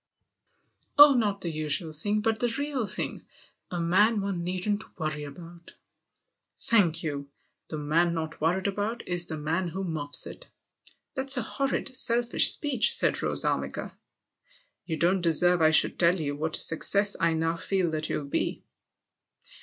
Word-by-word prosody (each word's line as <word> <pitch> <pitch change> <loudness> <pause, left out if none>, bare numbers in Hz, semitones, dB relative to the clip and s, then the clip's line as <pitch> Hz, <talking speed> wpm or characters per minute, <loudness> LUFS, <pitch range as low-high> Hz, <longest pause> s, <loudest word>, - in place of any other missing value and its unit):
" - - -30
Oh, 290 0 +9
not 210 -5 -1
the 170 - -3
usual 155 +1 -3
thing, 205 +7 -2
but 220 0 -1
the 240 0 0
real 285 -6 -3
thing. 205 +3 -5 0.4
A 175 - -4
man 205 +6 +2
one 195 -3 -4
needn't 185 +4 -4
worry 155 -3 -4
about." 170 +4 -13 0.4
" - - -53
Thank 180 -8 +2
you! 140 -3 -5 0.4
The 155 - -6
man 165 +4 0
not 160 -1 -6
worried 180 +4 0
about 205 +4 -3
is 175 -1 +1
the 160 - -5
man 165 +5 -2
who 190 +3 -5
muffs 155 -5 +2
it." - - -10 0.3
" - - -28
That's 270 0 +2
a 250 - -1
horrid, 270 +1 -3
selfish 240 -2 +5
speech," 275 -7 +2
said - - +1
Rose - - 0
Armiger. - - -3 1.0
"You 160 -2 -3
don't 180 +4 +1
deserve 175 +1 +4
I 155 - +5
should 160 - +4
tell 175 +1 +3
you 145 -2 -3
what 155 +2 -2
a - - -3
success 200 +5 +2
I 165 0 +1
now 165 +1 -1
feel 180 0 -2
that 155 0 -3
you'll 150 - -3
be." 140 - -3
175 Hz, 170 wpm, -26 LUFS, 160-210 Hz, 1.0 s, Oh